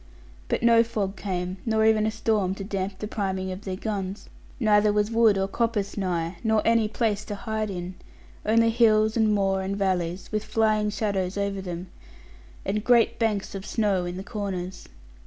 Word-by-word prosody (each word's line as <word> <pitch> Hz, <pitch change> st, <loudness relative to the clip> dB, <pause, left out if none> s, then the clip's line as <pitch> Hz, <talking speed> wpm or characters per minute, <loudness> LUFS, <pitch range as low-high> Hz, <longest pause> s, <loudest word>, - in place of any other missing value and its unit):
But -, -, -1 dB
no 230 Hz, -1 st, +6 dB
fog 205 Hz, -4 st, -3 dB
came, 180 Hz, -1 st, -3 dB
nor 220 Hz, -1 st, +2 dB
even 220 Hz, -1 st, +4 dB
a -, -, +2 dB
storm 215 Hz, -4 st, 0 dB
to 195 Hz, -, -6 dB
damp 195 Hz, -1 st, -3 dB
the 210 Hz, -, -5 dB
priming 190 Hz, -3 st, -2 dB
of 185 Hz, +3 st, -8 dB
their 190 Hz, -1 st, -3 dB
guns; 195 Hz, -1 st, -4 dB, 0.3 s
neither 210 Hz, -2 st, +4 dB
was 210 Hz, +1 st, +1 dB
wood 225 Hz, -3 st, +4 dB
or 195 Hz, 0 st, 0 dB
coppice 215 Hz, -1 st, -1 dB
nigh, 175 Hz, -3 st, -2 dB
nor 220 Hz, -1 st, +2 dB
any 230 Hz, -1 st, +3 dB
place 215 Hz, -1 st, -1 dB
to 205 Hz, -, -4 dB
hide 220 Hz, 0 st, -3 dB
in; 180 Hz, -1 st, -5 dB, 0.5 s
only 230 Hz, +1 st, +3 dB
hills, 220 Hz, -2 st, +4 dB
and 220 Hz, -2 st, +3 dB
moor, 195 Hz, -2 st, +1 dB
and 195 Hz, +1 st, -3 dB
valleys; 185 Hz, -2 st, -1 dB
with 215 Hz, -1 st, -1 dB
flying 215 Hz, -1 st, +1 dB
shadows 200 Hz, -2 st, -1 dB
over 200 Hz, -1 st, -1 dB
them, 180 Hz, -1 st, -5 dB, 0.8 s
and 210 Hz, +2 st, -1 dB
great 240 Hz, -1 st, +4 dB
banks 215 Hz, -4 st, 0 dB
of 195 Hz, -1 st, -5 dB
snow 200 Hz, -5 st, 0 dB
in 175 Hz, +1 st, -5 dB
the 190 Hz, -, -5 dB
corners. 195 Hz, -4 st, -5 dB
205 Hz, 180 wpm, -26 LUFS, 190-220 Hz, 0.8 s, no